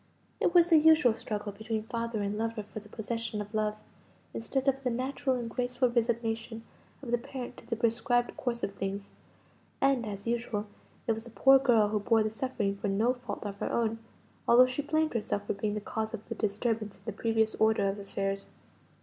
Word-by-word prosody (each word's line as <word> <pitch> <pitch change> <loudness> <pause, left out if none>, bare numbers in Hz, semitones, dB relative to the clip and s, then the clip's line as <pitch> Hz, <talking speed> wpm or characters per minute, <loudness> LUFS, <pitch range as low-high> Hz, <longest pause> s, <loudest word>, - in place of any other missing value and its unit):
It 345 - +1
was 345 0 +6
the 320 - +8
usual 310 -6 +6
struggle 210 -2 -4
between 220 +2 -3
father 230 -1 -2
and 200 +1 -1
lover 225 0 -2
for 210 - -8
the 210 0 -16
possession 225 0 -3
of 210 +1 -6
love, 215 -1 0 0.6
instead 265 +4 -2
of 270 0 +2
the 250 - +1
natural 260 +2 -1
and 240 -2 -3
graceful 245 +1 0
resignation 230 -1 -1 0.4
of 240 - -5
the 240 - +2
parent 250 +1 -7
to - - -14
the 230 - -1
prescribed 235 +1 +1
course 240 -2 -3
of 200 - -1
things; 195 0 -4 0.7
and, 270 -3 +3
as 200 -1 -6
usual, 230 -3 -1 0.4
it - - +2
was 225 +1 -3
the - - -9
poor 270 +5 +6
girl 230 -6 +4
who 210 0 0
bore 220 +2 +3
the 215 - -1
suffering 220 -4 -1
for 205 - -2
no 215 +5 +2
fault 245 -4 -7
of 200 -1 -5
her - - -2
own: 225 -1 0 0.5
although 245 +2 +8
she 255 +3 -2
blamed 310 +2 +1
herself 210 -3 -2
for - - -1
being 205 +1 -2
the 210 - -3
cause 220 +2 -3
of 215 - -12
the 230 - -3
disturbance 215 0 -1
in - - -24
the 220 - -2
previous 220 +1 +1
order 220 -2 +4
of 195 +1 -2
affairs. 195 0 -3
225 Hz, 205 wpm, -30 LUFS, 210-245 Hz, 0.7 s, the